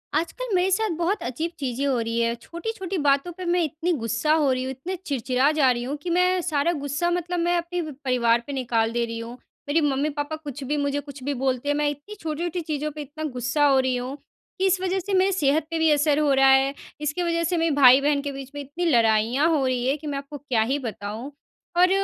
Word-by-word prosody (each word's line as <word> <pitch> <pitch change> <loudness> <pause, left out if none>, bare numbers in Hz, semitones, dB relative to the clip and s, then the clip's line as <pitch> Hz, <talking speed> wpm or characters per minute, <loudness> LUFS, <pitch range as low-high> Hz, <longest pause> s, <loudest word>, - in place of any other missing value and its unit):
आजकल 405 +9 -2
मेरे 365 +1 +3
साथ 440 +3 +1
बहुत 360 +5 0
अजीब 315 +8 -3
चीज़ें 265 0 -2
हो 265 -4 +1
रही 230 0 -1
हैं, 235 0 +1
छोटी-छोटी 380 - -5
बातों 285 +2 +2
पे 370 - -6
मैं 350 +1 +2
इतनी 320 +3 -2
गुस्सा 230 +2 0
हो 300 -4 +3
रही 255 0 0
हूँ, 260 - -3
इतने 305 +9 -5
चिड़चिड़ा 265 +1 +1
जा 280 -5 +4
रही 240 0 -2
हूँ 270 +4 -3
कि 360 - -3
मैं 360 +1 +2
सारा 330 -1 +1
गुस्सा 290 +3 -1
मतलब 355 0 -1
मैं 345 +1 +2
अपने 345 +1 -2
व 310 -2 -5
परिवार 235 -2 +2
पे 285 - -4
निकाल 230 -4 0
दे 235 0 0
रही 230 0 -5
हूँ। 230 +1 -7 0.4
मेरी 320 +3 +3
मम्मी-पापा 290 +1 -1
कुछ 290 -3 -8
भी, 295 +3 -1
मुझे 285 0 0
कुछ 280 -2 -10
भी 285 +2 -1
बोलते 265 +1 -1
हैं, 290 - +2
मैं 295 0 +1
इतनी 290 +9 -8
छोटी-छोटी 335 +3 -3
चीज़ों 305 -1 -3
पे 300 +1 -7
इतना 295 +2 -8
गुस्सा 250 +4 +1
हो 275 -2 +5
रही 260 -1 +1
हूँ 250 +2 -4 0.4
कि 380 - +2
इस 380 -1 +3
वजह 375 0 0
से 390 +2 -4
मेरी 380 +1 +4
सेहत 310 -4 +2
पे 330 - -1
भी 320 0 +4
असर 295 0 +3
हो 300 -2 +2
रहा 270 0 +5
है। 265 +1 +4 0.3
इसकी 300 +4 -1
वजह 335 -1 0
से 345 +1 0
मेरे 330 0 +2
भाई-बहन 280 +2 +6
के 285 0 -4
बीच 275 -1 -8
में 290 - -4
इतनी 290 +6 -4
लड़ाइयाँ 235 0 +3
हो 300 -5 +2
रही 250 -1 0
हैं, 275 +3 +1
कि 305 +1 -9
मैं 285 -1 -2
आपको 280 +1 -7
क्या 260 -5 0
ही 285 - +1
बताऊँ। 225 +1 -6 0.5
और 365 +1 +6
290 Hz, 240 wpm, -24 LUFS, 260-335 Hz, 0.5 s, भाई-बहन